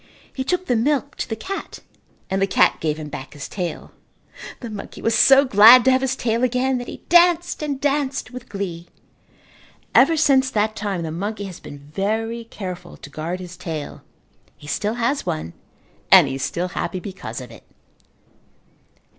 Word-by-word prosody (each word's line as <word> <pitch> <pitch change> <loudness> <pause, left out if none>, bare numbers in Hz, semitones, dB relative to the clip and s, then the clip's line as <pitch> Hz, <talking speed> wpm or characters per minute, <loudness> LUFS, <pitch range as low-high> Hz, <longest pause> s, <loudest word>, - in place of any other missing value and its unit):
He 265 - -3
took 360 +6 -1
the 245 - +1
milk 280 +4 0
to - - -4
the 225 - -2
cat 390 - -6 0.5
and 190 0 -1
the 195 - +3
cat 185 - +3
gave 155 -1 -1
him 155 -1 -7
back 135 -1 -8
his 145 - -7
tail. 180 -4 -5 0.7
The 235 -3 -7
monkey 205 -1 -8
was 225 - 0
so 270 +5 +6
glad 235 +2 +8
to 260 - +6
have 260 0 +3
his 265 -1 0
tail 235 -1 -1
again 255 +1 +1
that 245 - -7
he - - -9
danced 345 0 +4
and 285 -3 -3
danced 280 -2 -1
with 250 -1 -10
glee. 175 -4 -5 1.1
Ever 330 - +5
since 270 -3 +3
that 215 -2 0
time 200 -5 -3
the 160 - -4
monkey 205 +5 -4
has 190 -3 -8
been 145 - -10
very 215 +10 -3
careful 180 -5 -8
to 145 - -12
guard 165 +5 -4
his 180 -1 -9
tail. 165 -5 -6 0.6
He - - -15
still 210 +9 -2
has 245 +4 -1
one 80 +2 -3 0.6
and - - +8
he 135 - -3
is 135 - -5
still 180 +5 -2
happy 180 0 -3
because 180 - -7
of 125 -2 -10
it. 115 - -13
215 Hz, 180 wpm, -21 LUFS, 175-260 Hz, 1.1 s, glad